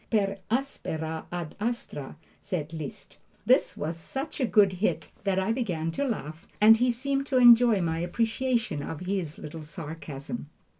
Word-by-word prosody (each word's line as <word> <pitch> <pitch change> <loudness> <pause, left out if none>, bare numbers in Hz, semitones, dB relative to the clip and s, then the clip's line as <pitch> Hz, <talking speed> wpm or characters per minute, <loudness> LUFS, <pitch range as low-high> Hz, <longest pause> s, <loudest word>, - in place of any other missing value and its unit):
"Per 200 -3 +1
aspera 160 - -2
ad 175 -3 -5
astra," 210 - -4 0.3
said 165 -5 -4
Liszt. 155 -4 -8 0.3
This - - +3
was 160 +2 -3
such 270 - -5
a 255 - +2
good 200 -4 +5
hit - - 0
that 195 -1 +1
I 190 +3 +1
began 180 -10 -1
to 220 - -1
laugh, 165 - -4
and 220 +2 +8
he 250 +2 +2
seemed 275 +3 -1
to 260 - +1
enjoy 240 -4 +7
my 165 -1 0
appreciation 230 - 0
of 155 +2 -6
his 180 -4 -2
little 155 +2 -8
sarcasm. 150 - -7
190 Hz, 155 wpm, -28 LUFS, 160-235 Hz, 0.3 s, and